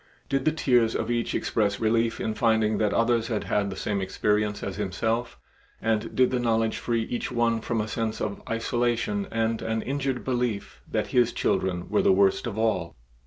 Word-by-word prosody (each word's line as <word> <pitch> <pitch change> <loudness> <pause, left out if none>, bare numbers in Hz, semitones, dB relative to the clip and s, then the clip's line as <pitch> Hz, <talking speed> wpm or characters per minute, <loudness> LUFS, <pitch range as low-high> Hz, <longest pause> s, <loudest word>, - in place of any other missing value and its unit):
Did 135 -1 0
the 155 - +4
tears 125 -7 +2
of 115 +1 -1
each 120 -1 -1
express 100 -3 0
relief 115 +1 +1
in 110 - -1
finding 110 -2 +2
that 105 -2 +2
others 115 -1 +2
had 110 -3 -1
had 100 -1 0
the 95 - -5
same 100 +1 -2
experience 105 +2 0
as 100 - -4
himself, 110 +4 -1 0.4
and 110 0 -1
did 130 0 +4
the 125 - +1
knowledge 115 -2 +1
free 115 -1 0
each 120 - -3
one 115 -2 +1
from 115 0 -1
a 105 - -1
sense 110 0 -2
of 100 -1 -3
isolation 115 -3 0
and 115 0 0
an 110 0 -2
injured 135 -2 -2
belief 120 -5 -2
that - - -1
his 125 -2 +4
children 90 -2 -1
were - - +2
the - - +4
worst 95 +3 +3
of 110 -3 -5
all? 110 -7 0
115 Hz, 190 wpm, -26 LUFS, 105-120 Hz, 0.4 s, the